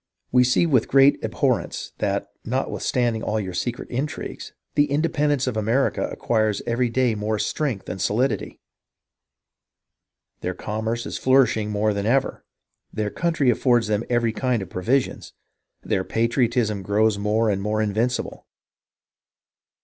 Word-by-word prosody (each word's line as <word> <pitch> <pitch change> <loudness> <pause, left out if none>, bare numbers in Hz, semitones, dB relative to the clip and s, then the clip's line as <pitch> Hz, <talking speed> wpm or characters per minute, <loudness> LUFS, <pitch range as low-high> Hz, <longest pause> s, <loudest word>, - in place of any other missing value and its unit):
.We 125 0 +5
see 125 +7 +3
with 130 -9 +2
great 135 +1 +5
abhorrence - - -1
that, - - -1
notwithstanding 120 -3 -1
all 110 -1 -1
your 95 -3 -4
secret 120 +7 -3
intrigues, 135 +5 -4 0.2
the 145 0 +3
independence 145 -2 +1
of 125 -3 -2
America 115 +5 +1
acquires 110 -3 0
every 120 +1 0
day 125 0 +1
more 105 +1 -2
strength 125 -2 -2
and 95 - -5
solidity. 120 +8 0 1.8
Their 90 0 -3
commerce 110 +2 -3
is - - -5
flourishing 125 -5 +3
more 105 0 +1
than 100 +1 -2
ever, 135 +3 +1 0.5
their 105 -1 -2
country 165 -7 +1
affords 120 0 +2
them 105 +1 0
every 120 -2 +1
kind 125 -4 0
of 90 - -12
provisions, 120 +9 -1 0.5
their 95 - 0
patriotism 115 -1 0
grows 105 +2 +1
more 105 +2 +1
and 100 -1 -1
more 105 +1 -1
invincible. 110 +4 -1
115 Hz, 135 wpm, -23 LUFS, 105-130 Hz, 1.8 s, We